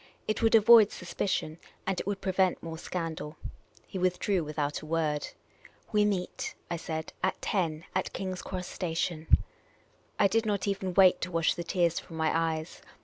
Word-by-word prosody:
It 215 - -1
would 225 0 +5
avoid 220 -1 +8
suspicion, 170 -2 -2 0.3
and 190 -1 -1
it - - -5
would 200 -1 -2
prevent 190 -1 +1
more 160 -1 -6
scandal. 165 -4 -4 0.5
He 190 - -6
withdrew 185 0 +1
without 150 -1 -2
a - - -9
word. 155 -2 0 0.3
" - - -24
We 210 0 +4
meet," 190 -3 -2 0.2
I 170 - 0
said, 160 -1 -5
" - - -32
at 190 - 0
ten, 165 -5 -1
at 185 - -1
King's 185 -1 -4
Cross 185 -1 -5
Station." 165 -2 -2 0.9
I 200 - +5
did 225 +3 +1
not 205 -2 -1
even 190 -2 -2
wait 185 -2 +6
to 180 - -3
wash 165 -1 +2
the 175 - -5
tears 170 -1 +1
from 165 - -10
my 160 0 +1
eyes. 160 -1 -1
180 Hz, 180 wpm, -29 LUFS, 160-195 Hz, 0.9 s, avoid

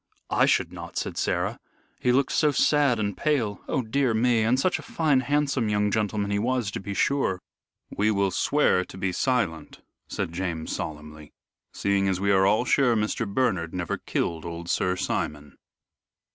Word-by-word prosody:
"I - - +4
should - - +1
not," - - -8
said - - -3
Sarah; - - -1 0.4
"he 125 - +2
looked 130 +2 +2
so 150 - +3
sad 140 -3 +3
and 100 -2 -1
pale. 125 -10 0
Oh 130 - 0
dear 125 +1 0
me! 115 0 +3
and 115 +4 +2
such 185 +6 +1
a - - -7
fine, 150 -5 +1
handsome 140 -3 0
young 105 0 +1
gentleman 105 -1 -1
he 100 - +1
was, 120 -2 0
to - - -4
be 100 +1 -6
sure." 135 -10 +1 0.6
"We 105 +2 +2
will 100 -2 +1
swear 145 -10 +2
to 95 - -12
be 95 0 -1
silent," 100 -7 -1 0.3
said 85 - -4
James, 85 -3 -3
solemnly, 75 0 -7 0.4
"seeing 100 -1 0
as 95 -1 0
we 100 +1 +1
are 95 0 +4
all 110 +5 +2
sure 125 -2 +3
Mr. 105 0 -1
Bernard 95 -9 0
never 90 -2 -3
killed 80 -2 -2
old 85 0 -5
Sir 90 0 +1
Simon." 75 -4 -3
105 Hz, 175 wpm, -26 LUFS, 95-125 Hz, 0.6 s, I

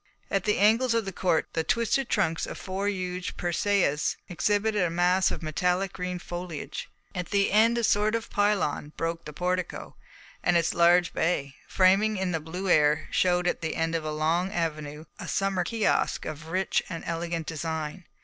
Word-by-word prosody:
At 195 -2 0
the 210 - +2
angles 230 +4 +4
of 225 -2 +1
the 195 - -4
court 175 -2 +1
the 160 - 0
twisted 235 +6 +1
trunks 165 -6 0
of - - -6
four 195 +1 -3
huge 180 -2 -4
persæas 175 -3 +1
exhibited 205 +5 +1
a 175 - +2
mass 180 +2 +3
of - - -5
metallic 180 +4 0
green 180 0 -3
foliage. 175 -2 -6 0.2
At 180 -2 -4
the 200 -1 +2
end 225 +3 +4
a 235 - 0
sort 210 +1 +2
of 230 0 -4
pylon 195 -8 0
broke 165 0 -3
the 150 - -6
portico, 180 +3 -3 0.5
and 175 -1 +3
its 165 -1 +1
large 175 +1 +4
bay, 140 -5 0
framing 195 +3 +3
in 190 -1 -1
the 165 - 0
blue 180 +5 -5
air, 150 -2 +3
showed 180 -1 +2
at 180 - 0
the 160 -1 -2
end 165 0 0
of 165 -1 -1
a 155 - -3
long 165 +5 0
avenue 155 -4 -3
a - - -6
summer 195 -2 0
kiosk 220 +4 0
of 155 0 -6
rich 185 +3 0
and 165 -2 -5
elegant 170 -1 -3
design. 160 +2 -4
180 Hz, 180 wpm, -27 LUFS, 165-195 Hz, 0.5 s, angles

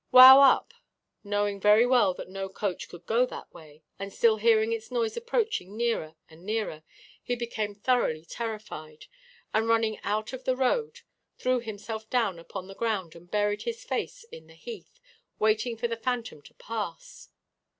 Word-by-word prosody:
'Wow 260 +2 +11
up!' 275 -2 +5 0.5
Knowing 205 -1 -1
very 210 +3 +6
well 245 -7 +3
that - - -8
no 195 +1 -5
coach 195 -1 -4
could 175 0 -12
go 235 +3 +3
that - - -10
way, 155 0 -15 0.2
and 195 0 -5
still 220 +2 +3
hearing 220 0 +3
its 225 -1 -5
noise 235 -3 -1
approaching 450 - -2
nearer 225 -10 -1
and 160 +1 -17
nearer, 210 -6 -3 0.4
he 245 - -2
became 220 -3 -3
thoroughly 200 -8 0
terrified, 210 -9 -7 0.5
and 220 +1 +2
running 225 -1 +2
out 215 +4 -2
of 260 0 -7
the 255 - +1
road 445 - 0 0.4
threw 255 0 +1
himself 220 -1 -7
down 225 -9 0
upon 185 +2 -8
the 195 - -9
ground 195 -6 -2
and 170 +1 -15
buried 205 0 0
his 470 +1 -5
face - - -4
in 480 0 -11
the - - -17
heath, 480 +1 -10 0.4
waiting 220 +2 +1
for 235 +2 -1
the 230 - -3
phantom 235 - -3
to - - -18
pass. 230 - -6
220 Hz, 170 wpm, -28 LUFS, 200-245 Hz, 0.5 s, Wow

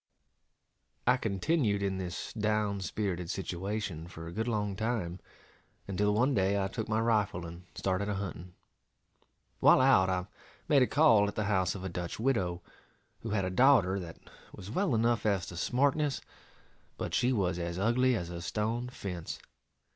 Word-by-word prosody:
I 125 - +5
continued 105 - 0
in 95 -1 -1
this 95 +3 -5
down 105 -2 0
spirited 90 -3 -3
situation 95 -2 -3
for 80 -2 -9
a 85 - -7
good 110 +6 -2
long 105 -4 -1
time, 105 -5 -2 0.7
until 100 +2 +1
one 125 +6 +3
day 100 -2 +2
I 95 0 -1
took 110 +3 -4
my 110 0 +1
rifle 105 -6 +1
and 85 +2 -10
started 95 +2 -1
a 105 - -1
hunting. 90 -2 -6 1.0
While - - +6
out, 130 -8 +5
I 90 -1 0 0.4
made 145 -3 +5
a 125 - +4
call 130 -10 +5
at 100 - -5
the 110 - 0
house 95 -3 +1
of 95 - -7
a - - -2
Dutch 85 +2 -5
widow, 95 -9 0 0.6
who 115 - -6
had 100 -3 0
a 90 - -2
daughter 100 -4 +4
that 85 -3 -8 0.3
was 95 - -9
well 185 - +1
enough 115 +1 +2
as 100 -4 +1
to 90 - -9
smartness, 140 - +1 0.8
but - - -4
she 125 - +2
was 90 -7 0
as 85 0 -3
ugly 120 +5 +3
as 85 -5 -4
a 85 -1 -6
stone 115 +6 -2
fence. 90 -9 -6
100 Hz, 170 wpm, -31 LUFS, 90-115 Hz, 1.0 s, While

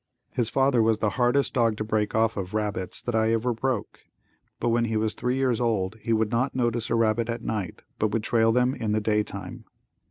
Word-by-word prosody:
His 120 -2 0
father 135 -2 +3
was 110 -1 +3
the 105 -1 0
hardest 130 +2 +1
dog 115 -4 +2
to 110 - -2
break 105 -1 -1
off 110 0 +2
of 100 +1 -5
rabbits 105 -3 -2
that 120 - -3
I 110 0 +2
ever 120 +2 0
broke, 120 -1 -3 0.6
but - - 0
when 115 0 +2
he 110 -1 -1
was 110 0 0
three 125 +1 -1
years 130 -3 +1
old 110 -3 0
he 115 - -3
would 110 -1 +1
not 125 +3 0
notice 120 -2 0
a - - +1
rabbit 115 0 +1
at 115 0 -3
night 105 -7 -4 0.2
but 110 - +2
would 105 +1 -1
trail 115 0 +3
them 125 +2 +2
in 110 -5 -2
the 110 - +2
day 105 0 +1
time. 100 -3 -8
115 Hz, 225 wpm, -26 LUFS, 110-120 Hz, 0.6 s, father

